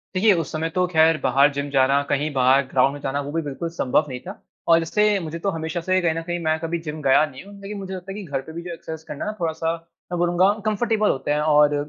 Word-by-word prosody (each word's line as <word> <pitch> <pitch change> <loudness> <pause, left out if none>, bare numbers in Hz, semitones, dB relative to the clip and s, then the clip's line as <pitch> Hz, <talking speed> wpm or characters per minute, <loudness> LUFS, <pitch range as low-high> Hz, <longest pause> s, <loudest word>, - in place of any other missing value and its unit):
देखिए, 205 +3 +5
उस 165 -5 -2
समय 160 +1 -2
तो 180 0 +3
ख़ैर 160 -2 +4
बाहर 140 +3 +4
जिम 140 0 -3
जाना, 135 0 +3
कहीं 145 +2 0
बाहर 130 +1 +4
ग्राउंड 130 +1 +2
में 145 - -7
जाना, 140 +1 -2
वो 145 +1 -6
भी 165 +1 -1
बिल्कुल 150 +3 -4
संभव 150 -2 +1
नहीं 125 -1 -5
था 190 - -8 0.3
और 165 0 +5
इससे 210 +4 +2
मुझे 165 -1 -6
तो 195 - -1
हमेशा 160 +1 -3
से, 185 +2 +1
कहीं 170 -2 +2
न 165 - -3
कहीं 175 +1 -3
मैं 155 0 +1
कभी 165 +1 -3
जिम 150 0 -5
गया 140 +2 +4
नहीं 130 0 -11
हूँ, 200 +1 -13
लेकिन 205 +1 -6
मुझे 190 -1 -6
लगता 185 +1 -8
है - - -6
कि 205 - -6
घर 140 -4 -3
पे 160 +4 -11
भी 170 - -5
जो 175 -1 -6
एक्सरसाइज़ 160 -1 -8
करना 145 - -5
है 210 - -1
ना, 215 - -13
थोड़ा-सा, 165 -1 -1 0.4
मैं 175 - -1
बोलूँगा 175 +2 +3 0.2
कम्फ़र्टेबल 215 0 +1
होते 140 +2 -1
हैं 150 - +2
और 150 -1 +4
160 Hz, 275 wpm, -23 LUFS, 145-180 Hz, 0.4 s, देखिए